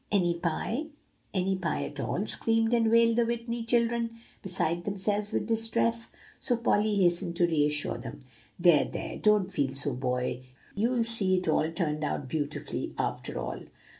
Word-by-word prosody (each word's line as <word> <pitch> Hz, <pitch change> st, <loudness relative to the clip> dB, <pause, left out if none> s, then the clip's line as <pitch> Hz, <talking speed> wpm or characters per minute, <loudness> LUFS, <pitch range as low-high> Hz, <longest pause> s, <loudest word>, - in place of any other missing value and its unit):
"Any 175 Hz, -4 st, +2 dB
pie 220 Hz, -, -2 dB, 0.5 s
any 190 Hz, 0 st, 0 dB
pie 170 Hz, -4 st, -1 dB
at 145 Hz, -, -7 dB
all," 180 Hz, +8 st, -1 dB
screamed 225 Hz, +1 st, +2 dB
and 230 Hz, -2 st, +3 dB
wailed 230 Hz, 0 st, +4 dB
the 240 Hz, -, +5 dB
Whitney 235 Hz, 0 st, -3 dB
children, 235 Hz, 0 st, +1 dB, 0.2 s
beside 175 Hz, -2 st, 0 dB
themselves 205 Hz, +2 st, -1 dB
with -, -, -1 dB
distress. 230 Hz, 0 st, +2 dB, 0.3 s
So 245 Hz, -, +1 dB
Polly 215 Hz, -2 st, +2 dB
hastened 175 Hz, -2 st, +2 dB
to 175 Hz, 0 st, +3 dB
reassure 150 Hz, -2 st, 0 dB
them. -, -, -8 dB, 0.4 s
"There, 170 Hz, -4 st, +5 dB
there, -, -, -6 dB
don't 210 Hz, -3 st, +3 dB
feel 140 Hz, -6 st, -1 dB
so, 140 Hz, 0 st, 0 dB
boys; 125 Hz, 0 st, -2 dB, 0.3 s
you'll 235 Hz, +3 st, +1 dB
see 210 Hz, -5 st, +3 dB
it 180 Hz, -, -3 dB
all 155 Hz, 0 st, +2 dB
turned 155 Hz, -3 st, -2 dB
out 145 Hz, -2 st, -2 dB
beautifully, 145 Hz, +2 st, -4 dB
after -, -, -2 dB
all." 60 Hz, +1 st, -4 dB
195 Hz, 160 wpm, -29 LUFS, 160-230 Hz, 0.5 s, the